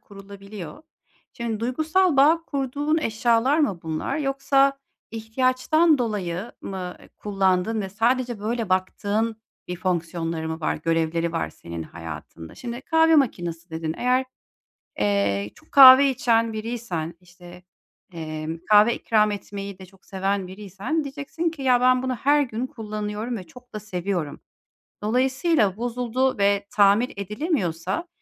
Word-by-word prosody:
kurulabiliyor. 200 - -11 0.5
Şimdi 230 -2 -4
duygusal 315 +7 +1
bağ 315 +5 +5
kurduğun 285 +2 -1
eşyalar 235 +3 +2
mı 235 - +1
bunlar 160 - -3
yoksa 275 -1 +2 0.3
ihtiyaçtan 255 +8 +2
dolayı 205 -3 -3
mı, 185 -2 -6
eee, - - -17
kullandığın 195 +1 0
ve 195 - -4
sadece 240 +3 0
böyle 225 0 -2
baktığın 205 +4 0 0.3
bir 180 - -4
fonksiyonları 170 -2 -2
mı 160 +1 -5
var, 155 - 0
Görevleri 165 +1 0
var 165 - -2
senin 85 -1 -8
hayatında? 80 0 -9
Şimdi 240 0 -6
"Kahve 320 +2 +4
makinesi" 175 - -1
dedin. 160 0 -3
Eğer, 250 +1 +2 0.8
eee, 100 0 0
çok - - -22
kahve 270 0 +10
içen 230 -3 +1
biriysen, 215 -8 -4
işte, 180 0 -15 0.5
emm, 155 0 -5
kahve 210 +2 +6
ikram 215 -2 +2
etmeyi 200 -1 -7
de 190 - -10
çok 190 +1 -23
seven 195 0 -2
biriysen 205 - -4
diyeceksin 290 +4 -3
ki: 320 -3 -10
"Ya 250 -2 +3
ben 255 0 +4
bunu 260 -1 -1
her 290 +4 +3
gün 245 -2 -3
kullanıyorum 215 -2 -5
ve 185 - -7
çok 245 +8 -17
da 215 - -4
seviyorum. 180 -6 -3 0.6
Dolayısıyla 255 - +1
bozuldu 245 +2 -1
ve 200 0 +2
tamir 205 +4 +4
edilemiyorsa, 210 - -2
215 Hz, 130 wpm, -24 LUFS, 180-255 Hz, 0.8 s, kahve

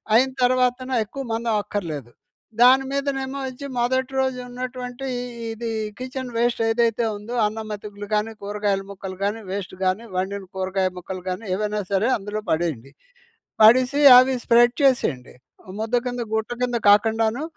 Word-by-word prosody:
అయిన 260 +3 +4
తరవాతన, 255 +1 +2
ఎక్కువ 270 +5 -7
మందం 230 0 -1
అక్కర్లేదు. 155 - -5 0.5
దాని 260 +2 +7
మీదనేమో 275 -1 -2
వచ్చి, 260 +2 -8
మొదటి 260 +2 0
రోజున్నటువంటి 250 0 -4 0.5
ఇది 230 +1 -5 0.3
కిచెన్ 255 -1 -5
వేస్ట్ 235 0 +1
ఏదైతే 230 0 +1
ఉందో, 225 +4 -7
అన్నం 220 +1 -3
మెతుకులు 205 0 -7
కానీ, 215 +2 0
కూరగాయల 205 -1 -1
ముక్కలు 190 -1 -8
కానీ, 210 +3 -1
వేస్ట్ 195 -2 -5
కానీ, 185 +5 0
వండిన 195 +2 -2
కూరగాయ 190 0 0
ముక్కలు 180 +1 -7
కానీ, 185 +5 -4
ఏవేనా 210 0 -2
సరే, 200 +6 +2
అందులో 210 +1 -5
పడేయండి. 155 -6 -2 0.7
పడీసి 255 +5 +5 0.2
అవి 255 +1 +5
స్ప్రెడ్ 240 +1 +5
చేసేయండి. 160 - +1 0.5
ముద్ద 225 +2 -1
కింద 245 -1 -3
గుట్ట 220 +2 -2
కింద 245 -1 0
కాకుండాను, 225 +5 +3
225 Hz, 135 wpm, -23 LUFS, 200-250 Hz, 0.7 s, దాని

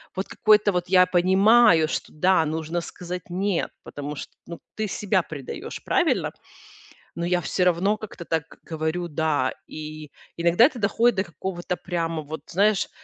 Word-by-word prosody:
вот 190 - -3
какое-то 210 -1 +3
вот 180 -1 -2
я 185 -1 +6
понимаю, 185 0 +5
что - - -4
да, 180 +1 +3
нужно 160 +2 -2
сказать 180 +1 -7
"нет", 190 +1 -1
потому 145 +1 -6
что, - - -8
ну, 170 - -8 0.2
ты 215 -1 -2
себя 190 -2 0
предаёшь, 140 -5 -7
правильно? - - +1 0.8
Но 170 +1 -3
я 180 0 +1
всё 180 +2 0
равно 180 +4 +2
как-то 205 -5 -9
так 160 -2 -1 0.2
говорю 160 +2 -3
"да". 150 -4 0
И 155 -1 -8 0.3
иногда 170 +6 +4
это 270 -4 -4
доходит 230 +3 +2
до 190 - +1
какого-то 175 +1 -5
прямо, 165 -3 -3
вот, 155 0 -7
знаешь, 200 +2 +2
175 Hz, 155 wpm, -24 LUFS, 160-190 Hz, 0.8 s, я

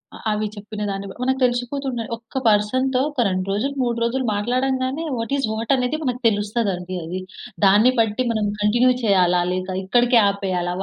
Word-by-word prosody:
అలా, - - -11
అవి 210 0 -1
చెప్పిన 210 +1 -8
దాన్ని 195 0 -4 0.2
మనకు 265 +1 0
తెలిసిపోతుంది. 245 0 -1
ఒక్క 230 +3 -10
పర్సన్‌తో 255 +5 +2
ఒక 270 -4 -1
2 185 0 -1
రోజులు 250 +8 -1
3 235 -1 -1
రోజులు 255 +3 0
మాట్లాడంగానే 260 +6 -1
వాట్ 230 +4 -3
ఈస్ 270 - 0
వాట్ 225 +3 -3
అనేది 255 +4 -1
మనకు 250 -2 -2
తెలుస్తదండి 205 -4 -1
అది. 175 +3 -4 0.5
దాన్ని 210 +6 +6
బట్టి 225 +3 +1
మనం 215 -2 0
కంటిన్యూ 240 +5 +4
చేయాలా 180 -4 +3
లేక 185 +1 -3
ఇక్కడికే 240 +4 +4
ఆపేయాలా 185 -3 -2
230 Hz, 160 wpm, -21 LUFS, 200-255 Hz, 0.5 s, దాన్ని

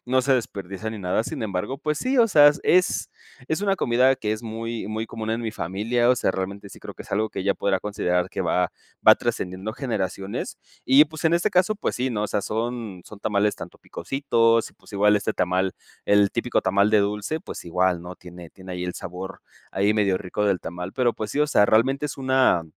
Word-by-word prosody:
no 130 +1 +2
se 135 +2 +2
desperdicia 100 -3 -4
ni 110 - -6
nada. 95 +4 0
Sin - - -5
embargo, 110 +6 -3
pues 150 -1 -2
sí, 260 - 0
o 230 -1 +5
sea, 145 -5 +7
es 180 0 +2 0.4
es 160 +3 0
una 200 -1 +2
comida 125 -2 +3
que 105 - -3
es 110 - -4
muy, 115 0 -5
muy 110 +1 -3
común 110 -1 -5
en 115 +1 -1
mi 115 - -2
familia, 115 +8 0
o - - +5
sea, 115 - +1
realmente 100 +2 -5
sí - - -13
creo - - -9
que - - -9
es - - -17
algo 110 +2 +1
que - - -4
ya 100 - +2
podrá 95 -2 0
considerar 90 -3 -1
que - - -4
va 90 -1 +1 0.4
va - - +10
trascendiendo 95 +4 -3
generaciones, 100 -6 -4 0.3
y 140 +3 +7
pues 155 +2 -9
en 165 +1 +4
este 170 - +1
caso, 185 +4 +3
pues 210 - -2
sí, 125 +1 0
¿no? 105 -3 -2
O - - 0
sea, 105 - 0
son 110 -4 -4
son 105 - -12
tamales 105 -1 +1
tanto - - -10
picositos 115 0 +1
y - - -28
pues - - -19
igual 105 +1 +4
este 100 - -1
tamal, 90 +1 0 0.3
el 100 -1 +4
típico 120 +1 0
tamal 100 +2 +3
de 110 - +5
dulce, 105 +9 -1
pues - - -8
igual, 90 +1 +1
¿no? 90 +1 -8
Tiene 90 -1 -12
tiene 95 -1 -10
ahí 90 0 -4
el 90 - -4
sabor 95 +2 -7 0.3
ahí 100 +2 +2
medio 100 -3 +2
rico 100 +3 -3
del 100 -3 +1
tamal, 90 +2 -6
pero 125 -3 +1
pues 105 -1 -5
sí, 145 - 0
o 150 - +4
sea, 105 -8 +4
realmente 135 +7 +2
es - - -6
una 130 -9 +3
105 Hz, 225 wpm, -24 LUFS, 95-125 Hz, 0.4 s, va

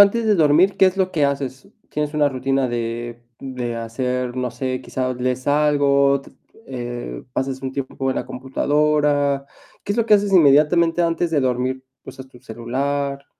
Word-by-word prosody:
antes 205 +3 +5
de 215 -1 +3
dormir, 165 +3 +4
¿qué 190 - +6
es 185 0 0
lo 185 -1 0
que 150 -3 +2
haces? 140 +2 -4 0.2
¿Tienes 150 0 -3
una 150 -1 +3
rutina 135 0 -1
de 120 0 -4 0.2
de 125 -3 -5
hacer, 125 +2 -3
no 125 -1 -2
sé, 130 0 -3
quizá, 130 -1 -3
lees 125 +1 -3
algo, 140 -2 +3
t - - -16 0.4
eh, 120 - -6
pasas 135 0 -2
un 130 - -4
tiempo 135 0 -4
en - - -3
la - - -2
computadora? 145 +1 0 0.4
¿Qué 205 - -1
es 215 - -3
lo 230 - +1
que 215 - +6
haces 205 -1 +1
inmediatamente 165 +1 +4
antes 170 0 0
de 155 -3 +2
dormir? 130 0 -1 0.2
¿Usas 130 0 -10
tu 125 -2 -18
celular? 140 +4 -3
140 Hz, 175 wpm, -21 LUFS, 125-150 Hz, 0.4 s, qué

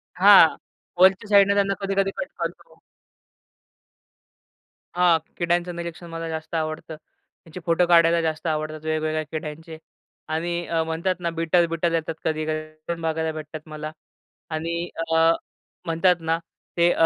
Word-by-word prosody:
हां, 190 -3 +7 0.4
वरच्या 190 +3 +5
साइडने 200 -1 +6
त्यांना 200 -1 +2
कधी-कधी 195 0 0
कट - - -3
करतो. - - -6 2.2
हां, 175 -2 +4 0.2
किड्यांचं 175 0 0
निरीक्षण 170 0 -7
मला 165 0 -5
जास्त 160 +1 -5
आवडतं. 155 0 -3
त्याचे 160 +2 -16
फोटो 170 +1 +3
काढायला 170 -1 +5
जास्त 160 0 -2
आवडतात. 155 0 -3
वेगवेगळ्या 155 0 -1
किड्यांचे 160 +1 -6 0.5
आणि 170 +2 -2
अ, 165 -1 0
म्हणतात 165 +3 -1
ना, 170 - -1
बिटर 165 +1 +2
बिटर 165 +1 -1
येतात 165 0 -1
कधी-कधी 155 0 -1 0.2
ते 170 - -1
बघायला 160 0 -1
भेटतात 155 0 -7
मला 155 0 -6 0.6
आणि 170 +2 -3 0.2
अ, 165 0 +5 0.5
म्हणतात 170 +2 +3
ना 165 0 0
अ, - - -5 0.4
ते 170 0 +5
165 Hz, 135 wpm, -24 LUFS, 155-175 Hz, 2.2 s, हां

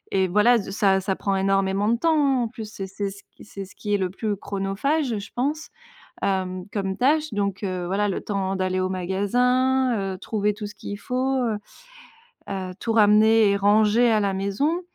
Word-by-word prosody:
et 190 -1 +3
voilà, 215 +6 +4
ze 195 - -7
ça 195 -1 +3
ça 190 0 -1
prend 195 -1 -1
énormément 195 +1 +1
de 235 - +2
temps, 325 +4 +2
hein, 275 -4 +2
en - - -1
plus, 220 -2 -8
c'est 195 -3 -6
c'est 195 +1 -4
ce 200 +1 -12
q - - -18
c'est 195 -1 -8
ce 190 - -17
qui 205 -1 -3
est - - +2
le 185 -2 -1
plus 210 +1 -2
chronophage, 210 +8 -1
je 200 - -9
pense, 295 +5 -2 0.5
hem, 185 -2 -1
comme 195 -2 -2
tâche 300 +1 +2
donc, 200 -1 -2
heu, 185 -2 -3
voilà 205 +3 0
le 190 - -2
temps 195 -2 -2
d'aller 185 0 -1
au 185 - 0
magasin, 245 +8 +1 0.2
heu, - - -9
trouver 210 0 -1
tout 210 0 -6
ce 205 - -10
qu'il 205 - -7
faut, 260 +2 -1
heu 220 -3 0 0.9
heu, 190 -2 -4
tout 225 - -1
ramener 215 0 +5
et 200 - +2
ranger 215 +4 +4
à 215 -1 +3
la 200 -1 0
maison 235 - 0
205 Hz, 205 wpm, -24 LUFS, 195-235 Hz, 0.9 s, ramener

